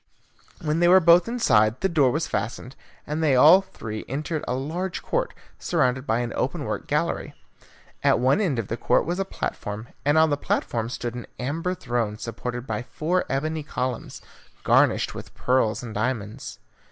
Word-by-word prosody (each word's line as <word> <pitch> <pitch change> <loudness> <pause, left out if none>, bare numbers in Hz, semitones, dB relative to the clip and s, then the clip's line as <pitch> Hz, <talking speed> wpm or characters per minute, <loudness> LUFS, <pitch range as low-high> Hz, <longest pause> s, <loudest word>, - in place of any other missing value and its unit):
When 155 +1 0
they 175 - +4
were 185 +2 +8
both 170 +1 +5
inside 115 - +2
the 190 - +3
door 155 -7 +3
was 155 +6 0
fastened, 125 +3 -4 0.3
and 150 +2 -3
they 150 -4 +3
all 155 +9 +8
three 110 - -7
entered 150 +4 -3
a 125 - 0
large 170 +7 -3
court, - - -1 0.3
surrounded 130 +2 0
by 115 +2 +1
an 120 -1 -3
open - - -2
work - - -4
gallery. - - -1 0.7
At - - +4
one 130 - +3
end 165 - 0
of 115 -4 -2
the 115 - -3
court - - +2
was 175 +4 -2
a 195 - 0
platform, 110 - -5
and 145 +2 +3
on 160 -1 +5
the 145 - +1
platform 115 -4 -1
stood 120 -1 -4
an 120 -1 -7
amber 165 +8 -2
throne 115 -8 -2
supported 120 +2 -5
by - - -3
four 165 +8 -1
ebony 155 +4 -1
columns, 130 -4 -4 0.4
garnished - - +3
with - - -10
pearls 125 -3 +1
and 115 -3 -7
diamonds. 110 -1 -3
135 Hz, 175 wpm, -24 LUFS, 120-160 Hz, 0.7 s, were